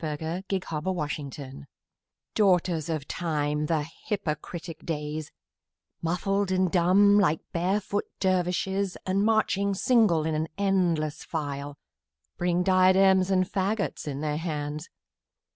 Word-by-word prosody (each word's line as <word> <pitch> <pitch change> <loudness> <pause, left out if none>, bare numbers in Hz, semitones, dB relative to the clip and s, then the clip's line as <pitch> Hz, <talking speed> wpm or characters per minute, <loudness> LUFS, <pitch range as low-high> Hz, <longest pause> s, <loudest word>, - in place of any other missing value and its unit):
Ralph 150 -2 -3
Waldo 165 +3 -3 0.6
Emerson 145 -1 -3
Days 135 0 -8 0.8
DAUGHTERS 180 -6 +2
of 155 -3 -3
Time, 150 -3 -1
the 155 -2 0 0.2
hypocritic 170 -3 -4
Days, 150 -1 -4 0.7
Muffled 195 +4 0
and 185 -1 +1
dumb 195 +3 +5
like 160 -6 +2
barefoot 195 +4 0
dervishes, 185 +1 0
And 190 +2 +1
marching 205 -2 +2
single 205 -8 +3
in 160 - 0
an 155 +1 -1
endless 175 -6 +1
file, 145 -2 -4 0.6
Bring 175 0 +1
diadems 190 0 +5
and 185 -1 +3
faggots 200 -2 -2
in 140 -1 -3
their 150 -1 -1
hands. 150 -1 -4
175 Hz, 115 wpm, -27 LUFS, 155-195 Hz, 0.8 s, dumb